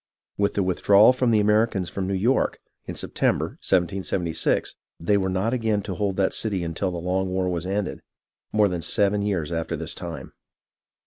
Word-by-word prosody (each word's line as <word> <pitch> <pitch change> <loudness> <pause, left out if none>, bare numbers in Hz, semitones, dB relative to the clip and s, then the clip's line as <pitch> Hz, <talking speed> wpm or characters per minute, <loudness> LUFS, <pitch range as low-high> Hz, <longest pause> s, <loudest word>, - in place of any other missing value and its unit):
With 100 0 0
the 100 - +1
withdrawal 100 +5 +5
of 130 - -7
the 110 -2 +4
Americans 105 -2 +2
from 95 0 -4
New 95 - -1
York, 120 +8 +1 0.3
in - - -5
September, - - 0
1776, 90 -1 0 0.2
they 95 +5 +1
were 95 -1 +1
not 95 +6 0
again 110 -4 0
to 95 - -4
hold 100 -1 -2
that 95 -1 +1
city 100 -5 -1
until 85 +3 -2
the 90 - -4
long 90 +2 -1
war 95 0 -1
was 90 0 -2
ended, 100 0 -2 0.5
more 105 -1 +4
than 90 -3 -3
seven 100 +2 +2
years 95 -6 -1
after 80 -1 -2
this - - -4
time. - - -7
95 Hz, 180 wpm, -24 LUFS, 90-105 Hz, 0.5 s, withdrawal